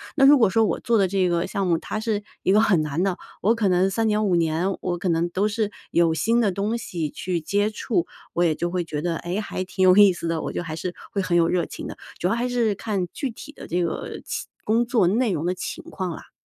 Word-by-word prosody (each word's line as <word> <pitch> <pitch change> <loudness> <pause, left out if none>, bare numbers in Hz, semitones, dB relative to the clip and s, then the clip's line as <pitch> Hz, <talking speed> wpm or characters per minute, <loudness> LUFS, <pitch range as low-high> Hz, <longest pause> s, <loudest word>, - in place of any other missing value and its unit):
那 270 -2 +5
如 290 +1 +8
果 225 -6 +4
说 225 +3 +3
我 175 - -1
做 230 -1 +2
的 195 -2 +3
这 185 -1 +1
个 170 -1 0
项 195 - -2
目， 170 -2 +2
它 190 - -5
是 215 -2 -1 0.2
一 190 - +3
个 210 - +5
很 195 -7 +4
难 155 +3 -2
的， 190 -2 0 0.2
我 220 +5 +3
可 210 -4 +1
能 180 +2 +3
3 225 +3 0
年、 210 0 +1
5 180 -3 +2
年， 170 +3 +1
我 175 -1 -2
可 180 - -3
能 170 0 +1
都 195 +4 +1
是 210 0 -1 0.2
有 170 -1 +3
新 230 +8 +2
的 205 -4 +2
东 205 +5 -1
西 170 -9 -4
去 175 +3 -3
接 205 +6 0
触， 215 -4 -1 0.3
我 175 - +2
也 165 -2 +3
就 175 +3 -2
会 180 0 -1
觉 150 -3 -4
得， 170 0 -1
诶？ 175 +4 -3
还 195 -3 -3
挺 190 0 -5
有 185 - +7
意 205 -2 +8
思 170 - -5
的， 165 -1 -1
我 - - -4
就 - - -3
还 160 -2 -5
是 175 +2 -4 0.2
会 200 - -1
很 180 -2 +1
有 165 -1 +4
热 175 -1 +1
情 - - -7
的， - - -8 0.2
主 175 - +1
要 190 - +1
还 240 +2 0
是 235 -4 +1
看 200 -4 -2
具 275 - -3
体 290 +6 -11
的 - - -10
这 175 +2 -1
个 170 - -3
期 - - -4 0.2
工 230 +3 +2
作 230 -7 +2
内 225 +3 +2
容 165 -1 -2
的 180 - 0
情 - - -5
况 185 -2 -4
啦。 - - -10
185 Hz, 285 characters per minute, -24 LUFS, 175-215 Hz, 0.3 s, 如